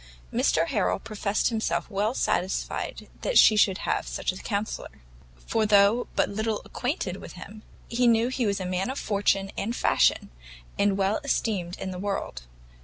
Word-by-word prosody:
Mr - - +2
Harrel - - +1
professed 210 -1 -1
himself 220 -7 -1
well 210 +4 -1
satisfied 190 -6 -2
that - - +1
she 215 - +8
should 195 -3 +4
have - - -2
such - - -2
a 185 - -9
counsellor; 205 - -4 0.4
for 225 - +1
though 210 +3 +4
but - - +2
little 220 +1 -2
acquainted 245 - -3
with - - -10
him, 205 +4 -10 0.3
he 245 +1 +1
knew 230 +1 +4
he 255 -3 -1
was 200 -1 0
a 185 - -4
man 185 +4 -1
of 265 - -4
fortune 200 -1 0
and 230 +4 -2
fashion, - - +2 0.5
and 200 -1 +3
well 195 +2 +1
esteemed 195 -10 -1
in 190 - -5
the 180 - -6
world. 185 - -4
205 Hz, 170 wpm, -26 LUFS, 195-225 Hz, 0.5 s, she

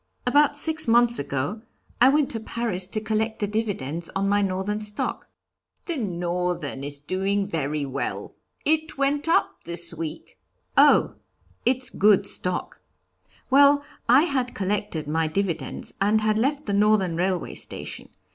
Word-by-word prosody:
About 290 +3 +3
six 315 0 +4
months 235 +1 +4
ago 140 +9 -3 0.4
I 255 - +8
went 290 0 +2
to 225 - -3
Paris 220 -5 -3
to 215 - -2
collect 220 +1 -1
the 210 - 0
dividends 195 -7 -3
on 195 0 0
my 205 +1 +2
Northern 195 +2 -2
stock." 210 0 -4 0.6
"The 340 - -3
Northern 175 - -3
is 145 0 -3
doing 195 +6 -1
very 150 -5 -2
well; 140 +1 -4 0.3
it 315 0 0
went 285 +3 +1
up 335 - +1
this 170 0 +2
week 165 -1 -7 0.2
" - - -45
"Oh! - - +3 0.5
it's 255 0 +1
good 200 -1 +4
stock. 180 -2 -4 0.7
Well, 285 +1 +6 0.3
I 260 +5 +7
had 265 -7 -1
collected 195 -5 -2
my 160 +1 0
dividends 165 -5 -3
and 210 +2 +3
had 215 0 +1
left 285 +5 0
the 205 - -2
Northern 200 -4 +3
Railway 180 0 -1
Station. - - -4
205 Hz, 145 wpm, -24 LUFS, 175-240 Hz, 0.7 s, I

